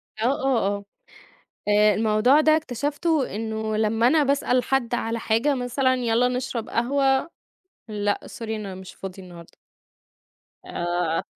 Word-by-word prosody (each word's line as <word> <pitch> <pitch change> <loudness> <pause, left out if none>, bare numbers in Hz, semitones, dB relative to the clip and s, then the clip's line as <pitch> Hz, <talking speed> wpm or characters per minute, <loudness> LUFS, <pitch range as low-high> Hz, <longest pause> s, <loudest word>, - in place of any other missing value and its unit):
آه، 220 - -2 0.2
آه، 250 -7 +2
آه. 200 0 -3 0.8
آآ، 210 0 +5
الموضوع 220 +7 +3
ده 310 0 +5
اكتشفته 290 - -1
إنه 220 0 -3
لمّا 225 +2 +2
أنا 305 +1 +4
باسأل 275 -2 +1
حد 245 -2 0
على 230 0 -2
حاجة 230 +7 +1
مثلًا 255 +1 +1
يالّا 245 0 +2
نشرب 250 -2 -3
قهوة، 270 +4 +1 0.6
"لأ، 205 -1 -1
sorry - - -11
أنا 210 -4 -4
مش 190 -1 -10
فاضي 190 0 -8
النهارده." 175 -2 -13 1.1
آآ، 175 -1 -1
230 Hz, 130 wpm, -24 LUFS, 210-265 Hz, 1.1 s, آآ